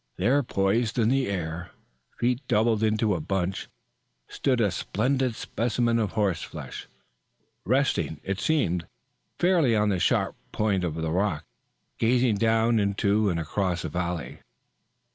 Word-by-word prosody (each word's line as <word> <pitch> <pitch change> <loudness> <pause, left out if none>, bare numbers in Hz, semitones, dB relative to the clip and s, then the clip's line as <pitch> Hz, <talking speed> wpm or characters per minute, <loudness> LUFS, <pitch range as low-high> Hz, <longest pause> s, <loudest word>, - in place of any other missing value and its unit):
There 125 +10 +3
poised 110 0 0
in 115 -2 +3
the 135 +1 +2
air, 85 -2 -4 0.5
feet 125 +2 0
doubled 110 0 +2
into 110 -1 +2
a 90 - -1
bunch, 95 +3 -2 0.6
stood 130 -3 0
a 105 -4 +2
splendid 125 +6 0
specimen 115 +1 0
of 105 -4 -1
horse 100 -6 0
flesh, - - -8 0.8
resting, 105 - +1
it 100 +1 -3
seemed, 90 - 0 0.5
fairly 170 -10 +3
on 105 0 +2
the 95 -3 0
sharp - - +1 0.2
point 100 -4 0
of 80 -3 -2
the 80 -1 -2
rock, 90 -3 0 0.5
gazing 120 -1 +3
down 115 +1 +3
into 100 +1 +1
and 85 -2 -1
across 90 +2 -1
the - - -3
valley. 90 -1 -3
105 Hz, 140 wpm, -26 LUFS, 90-120 Hz, 0.8 s, There